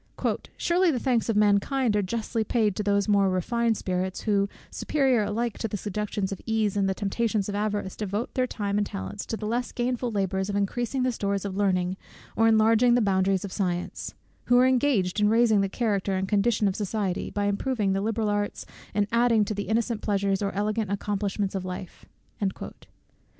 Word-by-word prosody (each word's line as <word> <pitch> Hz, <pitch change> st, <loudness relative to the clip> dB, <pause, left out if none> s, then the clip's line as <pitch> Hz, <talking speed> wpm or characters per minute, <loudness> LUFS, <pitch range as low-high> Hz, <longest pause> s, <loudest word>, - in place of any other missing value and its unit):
"Surely 355 Hz, +1 st, +2 dB
the 285 Hz, -, +1 dB
thanks 240 Hz, -2 st, 0 dB
of 225 Hz, -, +1 dB
mankind 210 Hz, +4 st, +2 dB
are 205 Hz, -, +3 dB
justly 225 Hz, +3 st, -2 dB
paid 215 Hz, -3 st, +1 dB
to -, -, -2 dB
those 200 Hz, -1 st, +1 dB
more 200 Hz, -2 st, +4 dB
refined 225 Hz, +5 st, 0 dB
spirits 185 Hz, 0 st, -2 dB
who, 200 Hz, -2 st, +1 dB, 0.2 s
superior 265 Hz, -6 st, +1 dB
alike 230 Hz, +2 st, -2 dB
to 225 Hz, -, -1 dB
the 205 Hz, -, -4 dB
seductions 205 Hz, 0 st, -3 dB
of 195 Hz, -, -5 dB
ease, 220 Hz, -3 st, +1 dB
and 195 Hz, -1 st, +1 dB
the 190 Hz, -, -1 dB
temptations 210 Hz, 0 st, -1 dB
of 205 Hz, -, -3 dB
avarice, 205 Hz, -2 st, -2 dB
devote 210 Hz, +2 st, -3 dB
their 255 Hz, -1 st, +1 dB
time 205 Hz, -3 st, -2 dB
and 205 Hz, -, 0 dB
talents 95 Hz, 0 st, -6 dB
to 225 Hz, -, -3 dB
the 215 Hz, -, -6 dB
less 240 Hz, +3 st, -1 dB
gainful 245 Hz, 0 st, -1 dB
labours 190 Hz, -2 st, -1 dB
of 200 Hz, -, -2 dB
increasing 240 Hz, +6 st, -1 dB
the 255 Hz, -, +2 dB
stores 200 Hz, -3 st, -2 dB
of 195 Hz, -2 st, -4 dB
learning 185 Hz, -2 st, +1 dB, 0.4 s
or 225 Hz, -, +4 dB
enlarging 225 Hz, +2 st, +5 dB
the -, -, +4 dB
boundaries 195 Hz, -2 st, +1 dB
of 195 Hz, -, -7 dB
science; 180 Hz, -3 st, -3 dB, 0.3 s
who 245 Hz, -, +4 dB
are 250 Hz, -, +6 dB
engaged 245 Hz, -8 st, +2 dB
in 210 Hz, 0 st, +4 dB
raising 225 Hz, -2 st, +4 dB
the 195 Hz, -, 0 dB
character 200 Hz, -3 st, 0 dB
and 190 Hz, +1 st, -1 dB
condition 210 Hz, +1 st, +2 dB
of 190 Hz, -, -1 dB
society, 205 Hz, -3 st, -2 dB
by 205 Hz, 0 st, -2 dB
improving 205 Hz, 0 st, 0 dB
the 195 Hz, -, 0 dB
liberal 220 Hz, +1 st, -1 dB
arts, 205 Hz, 0 st, -2 dB, 0.3 s
and 205 Hz, -1 st, +3 dB
adding 230 Hz, -2 st, +3 dB
to 215 Hz, -, -3 dB
the 205 Hz, 0 st, -4 dB
innocent 225 Hz, 0 st, 0 dB
pleasures 200 Hz, -1 st, 0 dB
or 200 Hz, -1 st, 0 dB
elegant 210 Hz, 0 st, -1 dB
accomplishments 200 Hz, 0 st, -2 dB
of 190 Hz, -2 st, -3 dB
life." 185 Hz, -1 st, -7 dB
205 Hz, 190 wpm, -26 LUFS, 195-230 Hz, 0.4 s, are